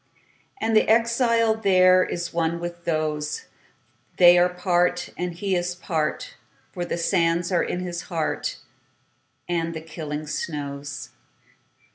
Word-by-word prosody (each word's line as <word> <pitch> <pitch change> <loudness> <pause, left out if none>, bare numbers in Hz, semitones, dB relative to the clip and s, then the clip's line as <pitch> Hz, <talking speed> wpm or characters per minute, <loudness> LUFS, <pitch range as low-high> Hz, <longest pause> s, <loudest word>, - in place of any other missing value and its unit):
And 225 0 0
the 215 - +4
exile 230 0 +3
thereIs 185 -4 +3
one 170 0 0
with 175 0 -7
those; 155 - -2 0.7
They 175 -1 +8
are 180 +1 +4
part, 180 0 0
and 180 0 -3
he 190 +2 -1
is 175 0 -1
part, 160 -4 -3 0.3
For 175 - -4
the - - -3
sands 170 0 +1
are 175 - +3
in 180 - -2
his 175 -1 -4
heart, 165 -4 -2 0.9
And 165 -1 -1
the 160 - -5
killing 155 -1 -6
snows. 145 -2 -5
175 Hz, 125 wpm, -24 LUFS, 165-185 Hz, 0.9 s, They